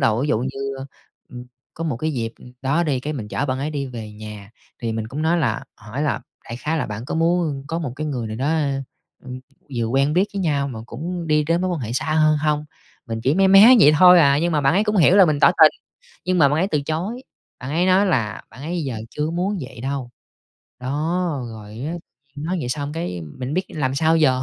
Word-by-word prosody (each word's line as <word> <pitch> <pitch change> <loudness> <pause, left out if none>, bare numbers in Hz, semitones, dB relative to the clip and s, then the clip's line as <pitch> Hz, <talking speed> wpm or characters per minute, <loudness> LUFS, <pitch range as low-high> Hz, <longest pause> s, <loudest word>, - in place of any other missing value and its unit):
đầu 125 0 +2
dụ 145 - +1
như, 135 +2 -4
ơ, 135 - -7 0.4
ưm, 125 -1 -9 0.3
có 165 - -5
một 145 -8 -1
cái 155 +4 -2
dịp 115 -3 -3 0.3
đó 140 +6 +1
đi, 145 -6 0
cái, 150 +4 -4
mình 110 -7 -6
chở 145 - -2
bạn 130 0 -1
ấy 145 +3 -2
đi 140 -2 -3
về 115 -4 -8
nhà, 105 -1 -10 0.3
thì 115 -1 -1
mình 110 0 -4
cũng 145 +5 -4
nói 165 +2 +2
là 120 -8 -1
hỏi 115 +7 -6
là 145 -3 0 0.2
đại 115 - -7
khái 155 +5 -2
là: - - -1
"Bạn 105 +2 -6
có - - -4
muốn 165 -4 0
có 165 - -2
một 145 -7 -4
cái 155 +1 -3
người 125 -6 -3
nào 110 0 -5
đó, 150 +6 0 0.6
ưm, 130 0 -8 0.4
vừa 115 - 0
quen 135 +5 +1
biết 185 +4 +3
với 200 - -3
nhau 145 -5 0
mà 115 -4 -7
cũng 170 +8 -5
đi 150 -1 +2
đến 165 +3 +1
mối 185 0 0
quan 170 -5 -2
hệ 115 -1 -4
xa 125 - -1
hơn 155 -1 +4
hông?" 150 0 0 0.4
Mình 115 -1 -4
chỉ 135 +6 +1
mé 195 +1 +4
mé 205 +6 +9
vậy 150 - +7
thôi 180 0 +8
à, 140 -2 +4
nhưng 170 +2 0
mà 150 - +2
bạn 135 -1 +3
ấy 205 +3 +3
cũng 210 -1 0
hiểu 175 +2 +5
là 195 - +8
mình 150 -3 0
tỏ - - +7
tình, - - +9 0.5
nhưng 185 0 +1
mà 145 -4 +6
bạn 150 +3 0
ấy 190 +3 +1
từ 150 -5 0
chối. 180 - -3 0.4
Bạn 130 - -6
ấy 170 +5 +1
nói 190 +2 +4
là 115 - -1
bạn 135 - -12
ấy 170 +2 -3
"giờ 125 -5 -3
chưa 150 +2 -2
muốn 185 +4 -1
vậy 130 -3 -9
đâu" 135 -2 -4 0.7
đó, 155 +3 -1
rồi 105 -2 -10
á, 130 +9 -5 0.4
nhiên 145 - -6
nói 185 +2 -1
vậy 125 - -4
xong, 145 +2 -3
cái, 160 - -4 0.2
mình 130 +3 -4
biết 185 +2 0
làm 135 -4 -2
sao 160 +3 +3
giờ? 130 -5 +3
145 Hz, 250 wpm, -21 LUFS, 125-165 Hz, 0.7 s, mé